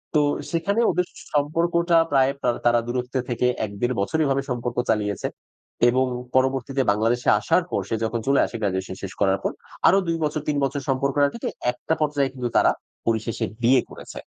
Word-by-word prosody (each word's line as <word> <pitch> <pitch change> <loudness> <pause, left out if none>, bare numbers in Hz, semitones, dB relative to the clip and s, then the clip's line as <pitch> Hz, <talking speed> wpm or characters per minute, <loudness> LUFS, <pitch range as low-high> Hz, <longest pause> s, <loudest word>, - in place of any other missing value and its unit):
তো 150 - +5 0.3
সেখানে 185 +6 0
ওদের 180 0 0 0.3
সম্পর্কটা 170 +3 +2
প্রায় 135 -1 +4 0.3
তারা 120 0 +5
দূরত্বে 125 +2 -2
থেকে 120 +1 +1
১-১.৫ 110 +2 -2
বছরভাবে 140 +4 +1
সম্পর্ক 120 -1 -3
চালিয়েছে 105 -2 0 0.6
এবং 130 +2 +2 0.3
পরবর্তীতে 130 +1 +1
বাংলাদেশে 115 +4 +1
আসার 175 +10 +2
পর 100 - 0
সে 115 - 0
যখন 115 +1 -1
চলে 140 0 +4
আসে - - -8
গ্র্যাজুয়েশন 95 -2 -2
শেষ 95 - -5
করার 95 -1 +3
পর। - - 0 0.4
আরো 190 - +6
২ 165 0 0
বছর 150 0 -1
৩ 150 -1 +1
বছর 135 +1 -1
সম্পর্ক 135 +1 0 0.2
থেকে 235 - -3 0.2
একটা 125 +6 -3
পর্যায়ে 145 -2 +1
কিন্তু 125 -2 -3
তারা - - +5 0.4
পরিশেষে 115 0 0 0.2
বিয়ে 125 +1 +5
করেছে। - - -10
130 Hz, 165 wpm, -23 LUFS, 115-145 Hz, 0.6 s, আরো